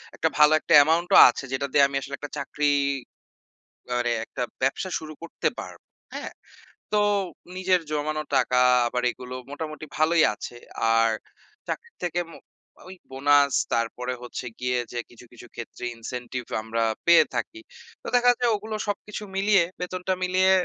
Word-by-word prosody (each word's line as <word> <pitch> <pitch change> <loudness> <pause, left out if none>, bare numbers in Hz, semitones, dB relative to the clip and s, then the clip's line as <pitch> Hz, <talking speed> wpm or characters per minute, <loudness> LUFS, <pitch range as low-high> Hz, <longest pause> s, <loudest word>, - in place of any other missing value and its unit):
একটা 160 - +1
ভালো 150 0 +7
একটা 170 - 0
অ্যামাউন্টও 165 +4 +5
আছে 125 - -4
যেটা 135 +1 -1
দিয়ে 140 - +5
আমি 140 - -7
আসলে 140 0 -6
একটা 145 - -8
চাকরি 150 +1 -3 1.3
মানে 120 -1 0
একটা 125 - -4 0.2
ব্যবসা 135 +8 0
শুরু 155 -1 -9
করতে 170 - -3
পারবো, - - -10 0.3
হ্যাঁ? - - -6 0.6
তো 210 - +2 0.6
নিজের 185 -1 +2
জমানো 155 +1 -1
টাকা 125 -1 +2 0.3
আবার 125 +1 -2
এগুলো 125 0 -10 0.2
মোটামুটি 155 +1 -6
ভালোই 160 +1 +4
আছে। 110 +3 -8 0.4
আর 115 0 +4 0.6
চাকরির 470 0 -6
থেকে 175 0 -1
ম - - -13 0.6
ওই 190 - -9 0.2
বোনাস 140 +1 +3 0.2
তারপরে 125 +2 -1
হচ্ছে 125 +1 -6
গিয়ে 125 0 0
যে 120 - -3
কিছু 120 0 -15
কিছু 120 0 -13
ক্ষেত্রে 120 +1 -7
ইনসেনটিভ 125 +2 -6 0.2
আমরা 115 +1 -2 0.2
পেয়ে 170 0 +7
থাকি। 335 - -3 0.4
তো - - -8
দেখা 245 0 +6
যায় 245 -1 +2
ওগুলো 215 +1 -5
সবকিছু 210 +1 -4
মিলিয়ে 195 -1 +4 0.2
বেতনটা 180 +1 -2
মিলিয়ে 185 +1 +3
145 Hz, 150 wpm, -25 LUFS, 125-180 Hz, 1.3 s, ভালো